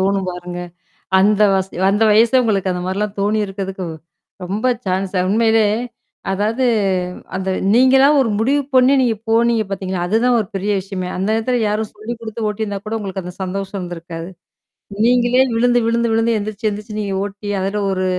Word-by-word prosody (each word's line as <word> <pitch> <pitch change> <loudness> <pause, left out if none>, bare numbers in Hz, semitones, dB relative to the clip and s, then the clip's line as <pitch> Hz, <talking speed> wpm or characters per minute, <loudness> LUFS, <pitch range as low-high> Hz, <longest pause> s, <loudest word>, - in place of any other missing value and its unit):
தோணும் 195 -1 0
பாருங்க. 180 0 -6 0.6
அந்த 205 +2 +3
வச 190 -1 +1 0.3
அந்த 205 +3 +1
வயசே 230 +4 +5
உங்களுக்கு 195 -4 0
அந்த 180 0 -4
மாரிலாம் 200 +2 -2
தோணியிருக்கிறதுக்கு, 195 -2 -2 0.6
ரொம்ப 200 +6 -4 0.2
ச்சான்ஸ்ஸு 185 0 -1
உண்மையிலே, 225 +1 +3 0.7
அதாவது 220 +6 0 0.7
அந்த 190 0 -3 0.3
நீங்களா 260 +2 +6
ஒரு 245 - +1
முடிவு 275 +6 +2
பண்ணீ, 255 +1 +5
நீங்க 235 -3 +1
போனீங்க 230 -1 +3
பாத்தீங்களா? 190 -2 -3
அதுதான் 235 +5 +2
ஒரு 210 - -3
பெரிய 205 +2 -1
விஷயமே. 185 -1 -5
அந்த 190 +3 -1
நேரத்துல 245 +3 0
யாரும் 215 +1 -2
சொல்லிக 215 +3 -6
குடுத்து 220 0 -4
ஓட்டியிருந்தா 205 -1 -4
கூட, 215 - -3
உங்களுக்கு 195 -2 -5
அந்த 180 0 -7
சந்தோஷம் 195 +1 -4
இருந்திருக்காது. 170 -1 -7 0.8
நீங்களே 245 +1 +3
விழுந்து 245 +1 +3
விழுந்து 235 0 +1
விழுந்து, 225 0 +2
எந்திரிச்சு 215 +1 -3
எந்திரிச்சு 210 +1 -6
நீங்க 200 -2 -2
ஓட்டி 205 +1 -7
அதில 200 +2 -1
ஒரு 185 0 -1
210 Hz, 155 wpm, -18 LUFS, 190-225 Hz, 0.8 s, நீங்களா